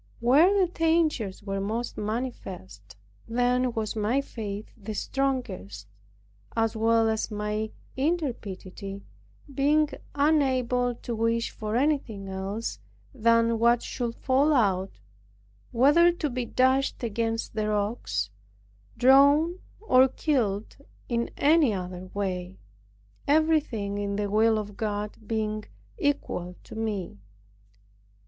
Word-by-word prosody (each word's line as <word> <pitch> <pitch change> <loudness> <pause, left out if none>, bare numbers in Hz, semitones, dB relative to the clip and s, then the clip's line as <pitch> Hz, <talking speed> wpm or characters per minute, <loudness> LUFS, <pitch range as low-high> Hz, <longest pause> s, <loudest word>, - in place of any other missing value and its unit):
When 310 +12 +5
the 375 - +5
dangers 320 - 0
were 195 -1 -3
most 225 +4 -3
manifest, 195 - -5 0.3
then 245 +2 +1
was 220 -1 -3
my 220 +5 +1
faith 215 -6 -6
the 215 -1 -7
strongest, 225 - -2 0.7
as 225 0 +1
well 225 0 +3
as 220 +1 -1
my 210 0 -2 0.3
intrepidity, 210 - -3 0.5
being 295 +2 +3 0.3
unable 255 -5 +2
to 235 0 -5
wish 230 +1 0
for 215 0 -4
anything 245 -7 0
else 195 +4 -4 0.3
than 230 -1 +3
what 235 +1 +4
should 235 -2 -3
fall 280 +3 +2
out, 195 - +1 0.7
whether 295 +8 +5
to 315 -5 -3
be 250 0 -2
dashed 260 +2 +1
against 225 0 -2
the 215 -1 -1
rocks, 205 - -1 0.7
drowned, 285 +7 +5 0.2
or 260 -11 +5
killed 230 -8 -1 0.3
in 235 -1 0
any 295 -6 +4
other 180 0 -6
way; 185 -2 -3 0.7
everything 285 -10 +1
in 200 0 -2
the 205 -1 -2
will 220 +1 +4
of 205 -1 -5
God 210 -1 -3
being 215 -1 -2 0.3
equal 180 -11 -1
to - - -12
me. 210 - -3
230 Hz, 110 wpm, -27 LUFS, 205-265 Hz, 0.7 s, When